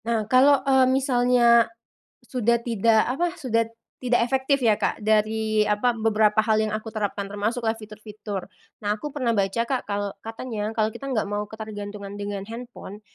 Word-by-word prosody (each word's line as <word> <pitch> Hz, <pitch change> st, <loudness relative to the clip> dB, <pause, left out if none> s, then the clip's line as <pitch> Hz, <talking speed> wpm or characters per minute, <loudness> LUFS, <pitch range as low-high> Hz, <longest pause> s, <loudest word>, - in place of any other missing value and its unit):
Nah, 225 Hz, -2 st, 0 dB
kalau, 260 Hz, +5 st, +5 dB
eee, 265 Hz, -1 st, +5 dB
misalnya 245 Hz, -3 st, +4 dB, 0.6 s
sudah 235 Hz, -2 st, +1 dB
tidak 225 Hz, -1 st, +3 dB
apa, 340 Hz, +8 st, -1 dB
sudah 230 Hz, -6 st, 0 dB, 0.3 s
tidak 245 Hz, -1 st, +2 dB
efektif 265 Hz, +1 st, +1 dB
ya, 225 Hz, -3 st, +4 dB
Kak, -, -, -2 dB
dari 215 Hz, 0 st, +1 dB
apa, 210 Hz, +4 st, +1 dB
beberapa 215 Hz, -1 st, +2 dB
hal 220 Hz, -1 st, +3 dB
yang 215 Hz, -, 0 dB
aku 220 Hz, +1 st, -4 dB
terapkan, 205 Hz, -2 st, -2 dB
termasuklah 220 Hz, +3 st, -1 dB
fitur-fitur. 215 Hz, -2 st, -7 dB, 0.4 s
Nah 205 Hz, 0 st, 0 dB
aku 220 Hz, +8 st, -6 dB
pernah 255 Hz, -5 st, -1 dB
baca, 200 Hz, +1 st, 0 dB
Kak, 255 Hz, -3 st, -3 dB
kalau 200 Hz, 0 st, -2 dB
katanya 225 Hz, -2 st, -5 dB
kalau 215 Hz, -1 st, +2 dB
kita 275 Hz, +4 st, -7 dB
nggak 230 Hz, -5 st, 0 dB
mau 205 Hz, +1 st, -3 dB
ketergantungan 205 Hz, -2 st, -7 dB
dengan 205 Hz, -1 st, -5 dB
handphone, 225 Hz, -2 st, -9 dB
220 Hz, 160 wpm, -24 LUFS, 210-245 Hz, 0.6 s, kalau